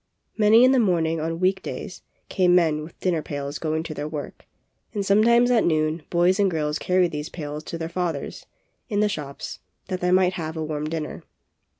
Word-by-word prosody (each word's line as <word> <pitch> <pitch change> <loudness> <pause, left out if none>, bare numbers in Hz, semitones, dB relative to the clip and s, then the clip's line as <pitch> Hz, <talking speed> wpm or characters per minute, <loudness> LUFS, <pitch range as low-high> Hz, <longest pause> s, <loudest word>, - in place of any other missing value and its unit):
Early 220 +3 +7
in 255 - +6
the 265 - +4
morning 165 -6 +1
on 165 +1 -3
week 190 +1 +1
days, - - -7 0.3
came 180 -2 +3
men 160 -4 +3
with 155 +2 -11
dinner 175 -4 +1
pails 145 0 -5
going 160 0 -1
to 160 - -6
their 145 0 -4
work, 150 -2 -7 0.5
and 200 -1 -1
sometimes 235 +5 +4
at 235 -3 +4
noon 155 0 +1
boys 180 +3 +3
and 200 -1 +4
girls 150 -3 -1
carried 180 -1 +2
these 150 +1 -5
pails 150 -2 -6
to 165 - -5
their 165 0 -4
fathers, 170 -4 -4 0.4
in 205 -2 +1
the 210 - +3
shops, 150 -8 -6 0.3
that 185 -2 -3
they 180 - +1
might 185 0 +4
have 160 -2 -5
a 160 - -2
warm 155 0 -3
dinner. 160 -2 -4
170 Hz, 200 wpm, -24 LUFS, 155-185 Hz, 0.5 s, Early